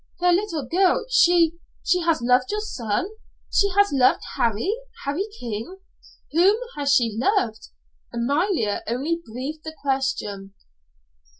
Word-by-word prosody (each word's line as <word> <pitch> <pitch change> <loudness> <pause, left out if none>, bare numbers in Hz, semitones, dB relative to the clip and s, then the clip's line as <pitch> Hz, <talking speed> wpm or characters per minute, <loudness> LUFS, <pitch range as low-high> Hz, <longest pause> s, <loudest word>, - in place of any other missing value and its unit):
"The 355 0 +3
little 345 -6 0
girl 375 - +2
she 340 -6 +4 0.3
she 360 - +2
has 330 -7 +1
loved 250 +1 +3
your 420 - -1
son 240 - -2 0.5
she 400 - +4
has 405 0 +5
loved 255 -2 +3
Harry 230 - 0 0.3
Harry 305 +9 -1
King? 230 - -5 0.5
Whom 370 +7 +4 0.2
has 285 -1 0
she 225 -4 +1
loved?" 255 - 0 0.4
Amalia 275 - 0
only 285 +9 -1
breathed 265 +7 -6
the 315 0 -7
question. 210 -8 -2
290 Hz, 125 wpm, -23 LUFS, 235-360 Hz, 0.5 s, has